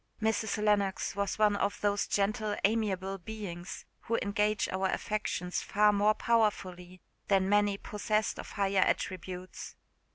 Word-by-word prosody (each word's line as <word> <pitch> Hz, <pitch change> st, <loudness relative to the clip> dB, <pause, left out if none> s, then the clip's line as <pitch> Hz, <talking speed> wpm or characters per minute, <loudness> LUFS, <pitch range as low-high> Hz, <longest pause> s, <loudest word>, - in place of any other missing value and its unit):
Mrs. 220 Hz, -1 st, 0 dB
Lennox 205 Hz, 0 st, +1 dB
was 200 Hz, -1 st, -1 dB
one 210 Hz, -1 st, +4 dB
of 200 Hz, 0 st, -1 dB
those 205 Hz, -1 st, +1 dB
gentle 210 Hz, +1 st, 0 dB
amiable 195 Hz, -3 st, 0 dB
beings, 185 Hz, -3 st, -7 dB, 0.2 s
who 230 Hz, -, +1 dB
engage 210 Hz, +1 st, 0 dB
our 190 Hz, +1 st, 0 dB
affections 190 Hz, -3 st, -2 dB
far 210 Hz, +1 st, +3 dB
more 210 Hz, +1 st, +3 dB
powerfully 185 Hz, -6 st, 0 dB, 0.3 s
than 190 Hz, -2 st, +3 dB
many 205 Hz, 0 st, +3 dB
possessed 210 Hz, +1 st, -1 dB
of -, -, -8 dB
higher 195 Hz, -1 st, +1 dB
attributes. 185 Hz, 0 st, -3 dB
205 Hz, 130 wpm, -31 LUFS, 190-215 Hz, 0.3 s, one